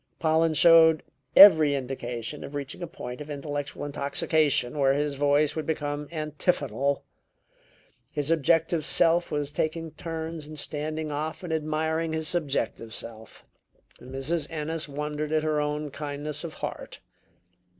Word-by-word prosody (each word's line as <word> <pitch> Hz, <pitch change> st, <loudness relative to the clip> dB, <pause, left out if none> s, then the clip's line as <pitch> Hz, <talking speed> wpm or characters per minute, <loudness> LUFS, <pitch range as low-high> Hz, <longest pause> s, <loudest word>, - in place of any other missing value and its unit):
Pollen 160 Hz, 0 st, +2 dB
showed 160 Hz, 0 st, +6 dB, 0.3 s
every 160 Hz, -7 st, +9 dB
indication 125 Hz, 0 st, -5 dB
of 145 Hz, -, -8 dB
reaching 140 Hz, +4 st, -5 dB
a 175 Hz, -, -3 dB
point 125 Hz, -5 st, -8 dB
of 150 Hz, -, -8 dB
intellectual 145 Hz, 0 st, -4 dB
intoxication 145 Hz, -1 st, +1 dB
where 135 Hz, -1 st, +4 dB
his 145 Hz, 0 st, 0 dB
voice 145 Hz, +1 st, +2 dB
would 155 Hz, -, -4 dB
become 145 Hz, -2 st, -2 dB
antiphonal. 145 Hz, -4 st, -1 dB, 1.1 s
His 145 Hz, +1 st, -1 dB
objective 165 Hz, +1 st, +2 dB
self 170 Hz, +2 st, +3 dB
was 145 Hz, -1 st, -2 dB
taking 160 Hz, +1 st, -2 dB
turns 160 Hz, -2 st, -6 dB
in 155 Hz, -, -9 dB
standing 155 Hz, +1 st, -4 dB
off 155 Hz, +4 st, -4 dB
and 170 Hz, -2 st, -3 dB
admiring 160 Hz, +1 st, -1 dB
his 160 Hz, -1 st, -2 dB
subjective 140 Hz, -8 st, -2 dB
self. 110 Hz, -1 st, -9 dB, 0.6 s
Mrs. 135 Hz, +4 st, -3 dB
Ennis 160 Hz, 0 st, -3 dB
wondered 150 Hz, +1 st, -4 dB
at 155 Hz, -1 st, +1 dB
her 155 Hz, -1 st, +1 dB
own 150 Hz, 0 st, -3 dB
kindness 150 Hz, +1 st, -5 dB
of 165 Hz, -2 st, -7 dB
heart. -, -, -6 dB
150 Hz, 135 wpm, -27 LUFS, 145-160 Hz, 1.1 s, every